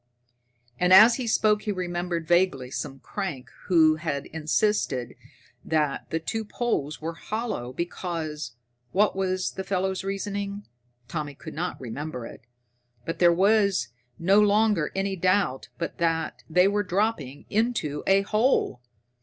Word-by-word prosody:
And 180 0 +2
as 215 +5 +9
he 255 -3 -3
spoke 215 -1 +3
he 215 - -2
remembered 175 -3 -3
vaguely 175 -8 +2
some 135 - -5
crank 145 -11 -5
who 160 -4 +5
had 150 -4 -3
once - - -16
insisted 160 - 0 0.5
that 150 -3 -1
the 165 - -1
two 220 +7 -3
poles 210 - -2
were 165 +2 -4
hollow 215 - -4
because 155 -4 -4 0.4
what 205 +1 +3
was 185 -1 -1
the 190 - -5
fellow's 190 0 -1
reasoning? 200 +1 -4 0.4
Tommy 150 -1 -4
could 155 +3 -9
not 175 +3 -3
remember 125 +1 -5
it. - - -10 0.6
But 165 0 -4
there 175 -1 +6
was 195 - +3 0.3
no 195 +5 +4
longer 210 -5 +3
any 195 0 -1
doubt 185 -7 +1
but 170 - -5
that 165 -1 0
they 180 +3 +5
were 205 +1 +1
dropping 180 - -1
into 210 -10 0
a 195 +1 +4
hole. 215 - +1
180 Hz, 140 wpm, -26 LUFS, 155-205 Hz, 0.6 s, as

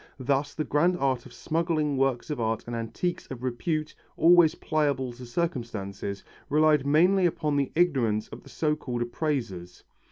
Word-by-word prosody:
Thus 140 +2 0
the 155 - -1
grand 170 +5 +2
art 135 -4 0
of - - -16
smuggling 155 +1 -1
works 135 +2 0
of 145 - -3
art 110 0 -1
and 120 - -5
antiques 115 +10 -3
of 130 -2 -7
repute, 155 +5 -2 0.2
always 170 -1 +6
pliable 140 -5 -1
to 125 0 -10
circumstances, 115 - -3 0.3
relied 150 -1 +3
mainly 180 +5 +4
upon 150 -3 -1
the 140 -1 0
ignorance 130 -11 +2
of - - -10
the - - -16
so 150 -1 0
called 120 -5 -3
appraisers. 120 - -3
140 Hz, 160 wpm, -27 LUFS, 120-155 Hz, 0.3 s, always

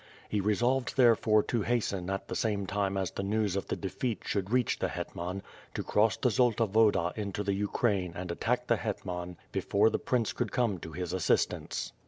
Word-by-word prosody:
He 105 - 0
resolved 120 +7 +1
therefore 115 -4 +5
to 120 - -1
hasten 100 -5 -1
at 95 0 -3
the - - -4
same 105 -3 0
time 100 0 -1
as 95 -2 -1
the - - -4
news 105 -1 0
of 100 - -2
the - - -1
defeat 110 +4 -3
should 100 -2 -1
reach 125 +1 +1
the - - +1
hetman, 90 +3 -5 0.3
to - - -2
cross 105 -1 +2
the 125 - +2
Zolta 115 0 +3
Woda 105 -4 +3
into 105 -1 -3
the 100 0 0
Ukraine 100 -2 0
and 90 -1 -4
attack - - 0
the - - +2
hetman 90 -1 -4
before 105 +3 +2
the - - 0
prince 120 -4 0
could 120 -4 -2
come 115 -7 +1
to 80 - -8
his 90 -2 -4
assistance. - - 0
100 Hz, 195 wpm, -30 LUFS, 95-115 Hz, 0.3 s, therefore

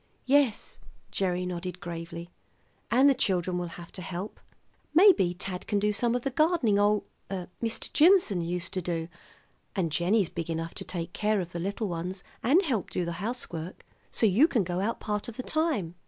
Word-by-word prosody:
"Yes," 270 -5 +2 0.3
Gerry 180 -2 0
nodded 180 0 -4
gravely, 170 0 -7 0.6
"and 260 +4 +5
the 280 - +6
children 185 -7 0
will 175 - -3
have 170 -1 -10
to 185 - -7
help. 180 +3 -6 0.6
Maybe 325 - +6
Tad 180 0 -5
can 205 - +1
do 210 +1 +1
some 235 +3 +1
of 245 - -2
the 275 - -1
gardening 280 - +3
ol 205 0 +3 0.3
Mr. 195 +4 -4
Jimson 320 - +5
used 175 +1 -3
to 185 - -1
do, 170 -1 -3 0.7
and 175 -5 0
Jennie's 180 +4 +2
big 170 -1 -5
enough 165 0 -3
to - - -2
take 170 -1 -5
care 215 0 +1
of 175 -2 -4
the 170 - -4
little 200 +4 -2
ones 180 +1 -4 0.2
and 315 +11 +4
help 250 - -1
do 180 - -2
the 170 - -3
housework 185 -7 -5 0.3
so - - +2
you 220 - +5
can 245 - +1
go 175 0 -2
out 215 +4 -1
part 210 -1 -2
of 235 - -8
the 255 - -4
time." 300 - 0
190 Hz, 185 wpm, -28 LUFS, 175-235 Hz, 0.7 s, the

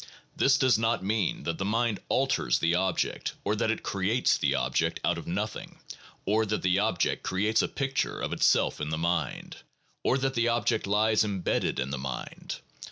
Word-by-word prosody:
This 135 0 +4
does 130 -5 +3
not 115 -2 0
mean 105 -1 0
that 85 0 -3
the - - -1
mind 110 +1 0
alters 130 - +2
the 85 +1 +1
object 95 0 -1
or 105 - 0
that 110 - 0
it 110 - -1
creates 100 +6 +1
the - - +1
object - - 0
out 85 -1 +1
of - - -10
nothing, 105 +5 -4 0.5
or 110 +2 +2
that 105 0 -2
the 90 +1 +3
object 100 -4 0
creates 105 +4 +1
a - - 0
picture 135 -1 -2
of - - -2
itself - - +2
in 75 - -2
the 80 - -1
mind, 85 -3 -2 0.5
or 130 - +2
that 135 0 -1
the 115 -1 +1
object 115 -3 +1
lies 105 +2 +3
imbedded 100 -4 -1
in 65 +1 -2
the 70 - -3
mind. 65 -2 -6
105 Hz, 185 wpm, -28 LUFS, 90-115 Hz, 0.5 s, This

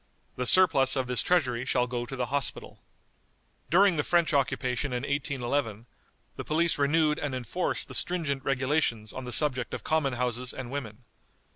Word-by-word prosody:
The 125 0 -2
surplus 160 -7 +5
of 130 -2 0
this 125 -1 -1
treasury 130 -9 +1
shall 125 -1 +1
go 120 -1 -4
to 135 - -6
the 125 -1 -1
Hospital." 140 -1 -2 0.9
During 185 +1 +4
the 150 - +1
French 170 -1 +2
occupation 130 -1 0
in 125 0 -2
1811, 135 -5 -2 0.5
the - - -4
police 165 0 0
renewed 150 +1 +2
and 145 -3 -3
enforced 130 - -3
the - - -10
stringent 150 -7 -1
regulations 130 -5 0
on 130 - -7
the 125 - -6
subject 130 -4 +2
of - - -8
common 155 -4 0
houses 125 0 -2
and 130 -2 -7
women. 125 -5 -6
135 Hz, 165 wpm, -28 LUFS, 125-150 Hz, 0.9 s, surplus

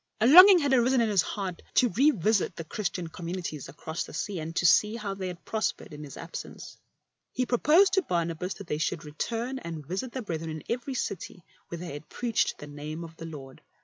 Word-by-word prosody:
A 220 - +3
longing 365 +8 +10
had 285 -5 +1
arisen 255 +1 +4
in 230 -2 +2
his 200 -4 +4
heart 190 -3 -4
to 245 - +5
revisit 215 - +2
the 165 - -6
Christian 180 +1 -3
communities 170 -3 -6
across 160 +2 -5
the - - -10
sea, 200 -4 -3
and 160 +1 -6
to 175 - +1
see 210 +5 +5
how 210 -4 -4
they 190 -1 -5
had 180 0 -8
prospered 220 -7 -2
in 150 0 -8
his 140 -2 -10
absence. 165 - -8 0.5
He 255 - 0
pro 245 -1 0
posed 365 +5 +5
to 385 - +4
Barnabas 170 - -2
that 200 - -9
they 150 -3 -3
should 155 0 -2
return 230 - -3
and 165 - -7
visit 190 - -4
the 260 - -4
brethren 165 -4 -4
in 155 -1 -6
every 250 +3 -3
city 185 -5 -4 0.2
where 170 - -6
they 170 -3 -7
had 145 +1 -9
preached 235 -2 0
the - - -9
name 150 +3 -7
of 165 -1 -10
the 165 - -7
Lord. 135 -4 -10
185 Hz, 215 wpm, -28 LUFS, 160-235 Hz, 0.5 s, longing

